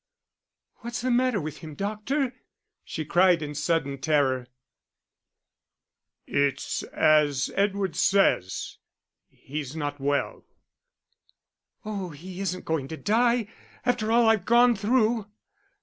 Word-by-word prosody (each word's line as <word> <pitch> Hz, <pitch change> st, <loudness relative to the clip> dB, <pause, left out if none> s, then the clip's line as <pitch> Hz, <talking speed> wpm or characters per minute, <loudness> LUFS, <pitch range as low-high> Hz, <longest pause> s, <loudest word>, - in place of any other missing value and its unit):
"What's 235 Hz, 0 st, -5 dB
the 255 Hz, +1 st, 0 dB
matter 245 Hz, -3 st, +2 dB
with 155 Hz, -2 st, -6 dB
him, 155 Hz, -2 st, -9 dB
doctor," 215 Hz, -, -2 dB, 0.5 s
she 155 Hz, -, -5 dB
cried, 175 Hz, 0 st, +4 dB
in 150 Hz, 0 st, -5 dB
sudden 150 Hz, -2 st, -1 dB
terror. 135 Hz, -4 st, +1 dB, 1.8 s
"It's 140 Hz, -1 st, 0 dB
as 145 Hz, -3 st, +2 dB
Edward 195 Hz, -4 st, 0 dB
says, 190 Hz, -, +1 dB, 0.5 s
he's 145 Hz, 0 st, -7 dB
not 145 Hz, -2 st, -4 dB
well." 140 Hz, +1 st, -1 dB, 1.4 s
"Oh, 200 Hz, -4 st, -4 dB
he 175 Hz, +5 st, -10 dB
isn't 185 Hz, -2 st, -3 dB
going 160 Hz, -4 st, -1 dB
to 160 Hz, -, -7 dB
die 235 Hz, +2 st, +2 dB, 0.4 s
after 240 Hz, -3 st, +1 dB
all 235 Hz, 0 st, +4 dB
I've 220 Hz, -4 st, +3 dB
gone 240 Hz, +1 st, +5 dB
through." 220 Hz, 0 st, +1 dB
185 Hz, 110 wpm, -26 LUFS, 150-225 Hz, 1.8 s, gone